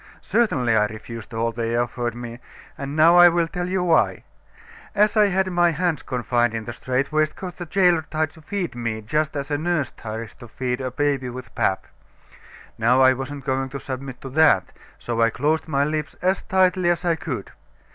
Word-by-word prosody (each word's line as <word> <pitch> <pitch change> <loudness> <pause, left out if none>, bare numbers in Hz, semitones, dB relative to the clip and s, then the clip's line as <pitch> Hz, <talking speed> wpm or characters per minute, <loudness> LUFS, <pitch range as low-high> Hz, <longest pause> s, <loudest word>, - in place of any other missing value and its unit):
Certainly, 130 - +2
I 105 -1 +3
refused 110 +1 -9
all 115 0 -1
they 115 0 -2
offered 120 -1 -2
me, 120 0 -7 0.4
and 140 +1 -5
now 165 +3 +6
I 175 0 +9
will 170 -1 +1
tell 180 +1 -4
you 185 -1 0
why. 170 -2 +2 0.7
As 210 +1 +3
I 210 -1 +5
had 190 0 0
my 175 -1 +3
hands 165 -1 -1
confined 120 -2 0
in 110 -1 -4
the 120 - -5
strait 130 +4 -2
waistcoat, 155 +4 -1
the 175 - -6
jailor 180 -2 +3
tried 155 -1 -1
to 160 - -17
feed 180 +2 -3
me 115 -2 -3
just 150 +7 -1
as 140 +1 -4
a 145 - 0
nurse 155 -6 -1
tries 110 0 -7
to 120 - -9
feed 125 +2 -3
a 130 - -2
baby 140 -1 -1
with 125 -1 -9
pap. 95 - 0 0.9
Now 120 +3 +4
I 130 0 +6
wasn't 135 +1 -6
going 135 0 -1
to 140 - -6
submit 130 -1 -6
to 135 - -7
that, 135 - +3 0.2
so 115 -1 -2
I 115 - +5
closed 155 +7 0
my 140 -2 +1
lips 150 0 -2
as 185 +2 +1
tightly 185 -1 +2
as 175 +1 0
I 170 -1 +3
could. 130 - -5
140 Hz, 195 wpm, -23 LUFS, 120-170 Hz, 0.9 s, I